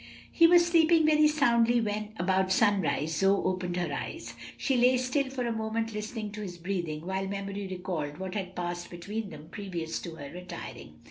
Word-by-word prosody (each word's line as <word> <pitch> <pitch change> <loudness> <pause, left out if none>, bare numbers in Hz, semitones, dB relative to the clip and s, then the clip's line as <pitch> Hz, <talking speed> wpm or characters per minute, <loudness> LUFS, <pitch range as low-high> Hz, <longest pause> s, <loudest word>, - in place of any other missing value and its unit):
He 335 - +6
was 345 0 +6
sleeping 330 -1 +5
very 305 0 +5
soundly 240 -6 +3
when, 215 -1 -3
about 190 +1 +1
sunrise, 165 -7 +2
Zoe 195 +1 +3
opened 185 -1 -1
her 175 -5 -1
eyes. 330 - -5 0.2
She 270 - 0
lay 250 +1 +5
still 255 +2 0
for 260 -2 -3
a 235 - 0
moment 225 0 -2
listening 210 0 -4
to 210 +1 -7
his 180 -4 -6
breathing, 170 -3 -3
while 190 +1 -2
memory 200 0 -4
recalled 180 -6 -4
what 190 -1 -5
had 190 -3 -4
passed 175 0 -4
between 200 +5 -5
them 155 -1 -11
previous 175 -5 -4
to 165 -2 -7
her 145 -2 -8
retiring. 180 +1 -8
200 Hz, 185 wpm, -29 LUFS, 180-235 Hz, 0.2 s, He